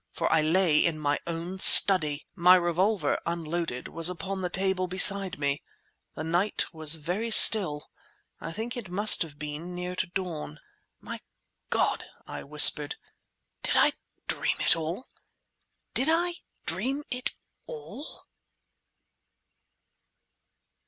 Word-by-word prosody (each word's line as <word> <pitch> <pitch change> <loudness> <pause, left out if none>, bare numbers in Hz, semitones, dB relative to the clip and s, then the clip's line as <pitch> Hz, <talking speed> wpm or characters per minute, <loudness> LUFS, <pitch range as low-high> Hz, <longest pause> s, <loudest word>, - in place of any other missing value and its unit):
for - - -3
I 160 - +2
lay 160 0 +1
in 165 -2 -1
my 145 -1 -2
own 170 +3 -7
study! 155 -8 +7
My 180 -1 +4
revolver, 185 +4 -1
unloaded, 170 -5 -5
was 165 +1 +1
upon 190 +2 -7
the 180 - -4
table 190 0 -2
beside 190 +1 +2
me. 140 -1 -2 0.5
The 155 - -7
night 175 +6 -2
was 160 -1 +1
very 180 +9 -5
still. 190 -9 +5 0.5
I - - -8
think 225 +7 -7
it 230 -7 -8
must 205 +4 +3
have 150 -4 -6
been 150 +4 -8
near 180 0 -6
to 185 - -3
dawn. 170 -5 -7 0.4
"My - - -9 0.5
God!" - - -2 0.2
I - - -9
whispered, 150 0 +4 0.7
"did - - -3
I - - +3 0.3
dream - - -3
it - - +2
all? 165 +9 -6 0.9
Did 265 - -1
I 345 +2 0 0.3
dream 275 +3 -4
it 250 0 -5 0.3
all?" 445 - -11
175 Hz, 125 wpm, -25 LUFS, 155-195 Hz, 0.9 s, study